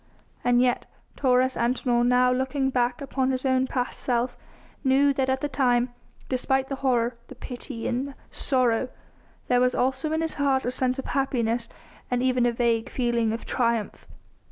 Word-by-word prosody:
And 245 0 +3
yet 245 -1 0 0.3
Taurus 255 -1 +2
Antinor, 240 0 +1
now 250 +1 +4
looking 265 +1 0
back 245 0 0
upon 265 -1 -1
his 260 0 -2
own 260 0 +2
past 250 -1 -3
self, 245 0 0 0.5
knew 275 +1 +4
that 265 -1 0
at 265 0 0
the 290 - 0
time, 250 -3 +1 0.3
despite 265 +1 0
the 275 - -3
horror, 245 -3 0
the - - -11
pity 245 -2 -6
and 250 +3 -1
the 280 - -10 0.2
sorrow, 255 -2 +1 0.6
there 245 0 +3
was 250 0 +2
also 265 +4 0
in 320 +1 0
his 325 -1 -1
heart 270 -2 +2
a 245 - 0
sense 255 0 0
of 270 - -5
happiness 240 -4 0 0.4
and 245 0 0
even 250 -2 +2
a - - +2
vague 230 -1 0
feeling 235 -3 0
of 225 - -5
triumph. 235 -3 -1
255 Hz, 175 wpm, -26 LUFS, 240-265 Hz, 0.6 s, now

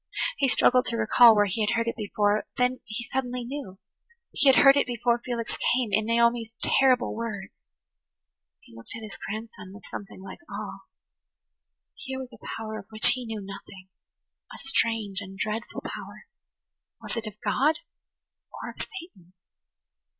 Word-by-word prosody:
He 275 - +4
struggled 250 +1 +4
to 230 - -2
recall 230 +1 +7
where 205 0 +5
he 205 +3 -2
had 210 - +2
heard 230 0 0
it 230 - -1
before; 210 -1 +1
then 250 +1 +2
he 230 +2 -5
suddenly 250 -1 -1
knew–he 285 - -5
had 265 - +7
heard 275 0 +9
it 280 - +2
before 240 0 +1
Felix 235 -2 -3 0.2
came 250 -3 0
in 215 - +3
Naomi's 235 -1 +2
terrible 255 -2 +3
words! 215 -4 -4 1.1
He 115 - -18
looked 115 - -10
at 225 - -7
his 215 - -8
grandson 215 -2 -7
with 210 - -12
something 200 -2 -7
like 195 - -9
awe. 200 -1 -6 1.1
Here 265 -13 -6
was 260 -1 -7
a 225 - -15
power 220 -1 -5
of 195 - -12
which 215 0 +2
he 250 -2 -1
knew 220 -2 -4
nothing–a 195 -1 -13
strange 220 -4 +1
[Page 200 - -7
113] - - -11
and 195 - -11
dreadful 215 +3 -3
power. - - -8 0.7
Was - - -6
it 230 -1 -3
of 210 -1 -9
God! 300 +4 +3 0.8
Or - - -6
of - - -20
Satan? 200 - -9
225 Hz, 165 wpm, -27 LUFS, 205-250 Hz, 1.1 s, heard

